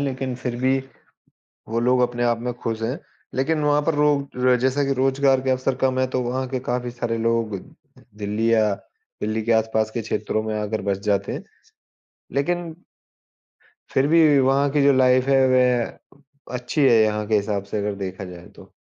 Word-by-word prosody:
लेकिन 130 -2 -2
फिर 125 -1 -4
भी 130 +1 +3 0.9
वो 115 +1 0
लोग 125 +2 +2
अपने 120 -1 0
आप 120 -1 +1
में 125 0 -3
खुश 115 -2 -4
हैं। 120 +5 -2 0.4
लेकिन 155 +5 0
वहाँ 145 0 +3
पर - - +1
रो 140 -4 +2
जैसा 130 +2 +1
कि 135 0 +1
रोज़गार 135 0 +2
के 130 - -2
अवसर 130 0 0
कम 130 -1 +1
है 130 - +2
तो 130 - +1
वहाँ 130 +2 -2
के 130 -1 -2
काफ़ी 125 0 -2
सारे 120 -1 -3
लोग 115 -2 0 0.6
दिल्ली 105 +2 -1
या 110 -2 +3 0.5
दिल्ली 110 +1 -1
के 115 - +1
आसपास 110 -1 +1
के 120 - -2
क्षेत्रों 110 0 -2
में 110 0 -3
आकर 105 +1 -3
बस 100 - +1
जाते 100 -1 0
हैं। - - -6 0.9
लेकिन 170 +3 -1 1.2
फिर 135 +1 +3
भी 155 -3 +5
वहाँ 135 +2 +3
की 145 0 +2
जो 140 0 +5
लाइफ़ 130 0 +3
है, 135 -1 +5
वह 130 +2 -1
अच्छी 125 +5 -2
है 115 -3 +5
यहाँ 105 0 0
के 110 - +2
हिसाब 100 -1 -1
से 100 +2 -5
अगर 105 0 -2
देखा 95 -1 -6
जाए 90 -1 -11
तो। - - -16
125 Hz, 185 wpm, -22 LUFS, 110-135 Hz, 1.2 s, भी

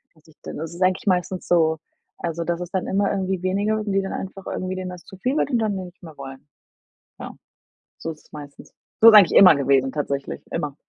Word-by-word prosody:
Dass 155 - -26
ich 155 - -21
dann - - -7
das 160 +2 -6
ist 180 - -11
eigentlich 185 +2 0
meistens 180 0 -1
so, 160 -2 +2 0.4
also 170 0 -4
das 170 +1 -3
ist 175 +1 -7
dann 185 - -1
immer 200 +1 +1
irgendwie 190 -2 -2
weniger 205 +3 0
und 210 -1 -4
die 195 0 +1
dann 195 - -5
einfach 195 0 -7
irgendwie 185 0 -4
denen 185 -1 -5
das 180 -1 -11
zu 190 - -13
viel 255 +8 -1
wird - - 0
und 240 - +2
dann 215 -2 -1
die - - -4
nicht 180 +1 -16
mehr 160 -3 -12
wollen. 135 +1 -10 0.7
Ja, - - -8 0.7
so 165 - -5
ist 155 - -14
es - - -27
meistens. 145 -1 -12 0.3
So 230 - +10
ist - - +6
eigentlich 200 -4 +7
immer 180 -6 +8
gewesen 135 -1 +2
tatsächlich, 140 -1 -4
immer. 145 -2 -3
180 Hz, 235 wpm, -22 LUFS, 155-195 Hz, 0.7 s, So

